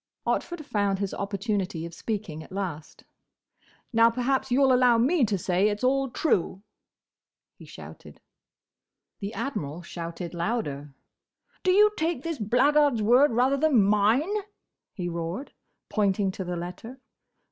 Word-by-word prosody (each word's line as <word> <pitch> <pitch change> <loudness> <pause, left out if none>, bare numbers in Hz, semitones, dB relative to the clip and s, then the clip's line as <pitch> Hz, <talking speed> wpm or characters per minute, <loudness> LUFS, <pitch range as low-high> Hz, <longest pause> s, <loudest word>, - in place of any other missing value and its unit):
Otford 345 -4 -2
found 205 -6 0
his 200 -1 -3
opportunity 200 -4 -3
of 170 - -9
speaking 195 -5 -5
at - - -13
last. 180 -6 -6 0.9
"Now, 230 0 +6
perhaps 260 +3 -1
you 260 +3 +3
'll 260 - +4
allow 250 -2 +5
me 275 +6 +3
to 200 -2 -1
say 185 +3 +1
it's 205 +3 -4
all 270 +1 +2
true," 200 - 0 0.9
he - - -15
shouted. - - -12 1.0
The 200 0 -4
Admiral 175 - -4
shouted 170 0 -6
louder. 160 - -3 0.7
"Do 370 - 0
you 420 +3 +6
take 320 -4 -1
this 330 -4 -4
blackguard's 255 +2 +3
word 245 +5 +5
rather 255 +4 +2
than 280 -7 +4
mine?" 210 - +2 0.6
he 180 -3 -5
roared, 170 - -5 0.3
pointing 200 -2 +1
to 190 - -6
the 180 0 -4
letter. 180 +9 -7
210 Hz, 135 wpm, -26 LUFS, 180-265 Hz, 1.0 s, Now